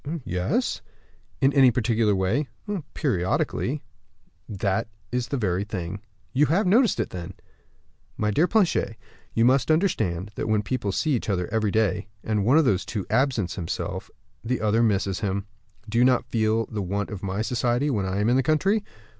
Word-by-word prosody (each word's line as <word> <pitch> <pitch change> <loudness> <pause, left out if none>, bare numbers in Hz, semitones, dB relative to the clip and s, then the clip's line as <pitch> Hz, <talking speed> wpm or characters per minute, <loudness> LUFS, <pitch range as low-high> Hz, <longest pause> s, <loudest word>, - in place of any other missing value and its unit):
"Yes." 120 - -1 0.6
"In 135 +1 +4
any 135 -2 +7
particular 115 -3 +2
way?" 100 +10 0 0.5
"Periodically." 95 - 0 0.7
"That's 100 +2 -1 0.4
the 140 - -1
very 95 -4 0
thing. 100 -1 -5 0.3
You 145 +3 +4
have 190 +7 +2
noticed 220 - +4
it, 110 - -1
then?" 90 +1 -7 0.8
"My 105 -1 +1
dear 155 - +3
Planchet, 205 -4 +1 0.4
you 115 - +4
must 130 +2 +3
understand 105 - +1
that - - -4
when 105 -1 +2
people 105 -3 -2
see 155 - 0
each 120 -5 -1
other 90 -3 0
every 110 -2 +1
day, 105 0 +1 0.2
and 105 -2 0
one 125 +9 +4
of 160 - +5
the 100 -7 +3
two 100 -1 -4
absents 125 -9 +1
himself, 85 -3 -4 0.3
the 120 +2 -1
other 110 +2 +2
misses 100 -4 +1
him. 100 -1 -2 0.4
Do 115 +2 0
you - - +6
not 125 -1 +3
feel 110 0 +1
the 105 0 -4
want 100 +3 -2
of 100 -3 -6
my 100 +2 -2
society 120 +4 0
when 100 -6 -1
I 95 +2 -1
am 105 - +1
in 120 +2 +4
the - - +4
country?" 190 - +2
110 Hz, 170 wpm, -25 LUFS, 100-130 Hz, 0.8 s, any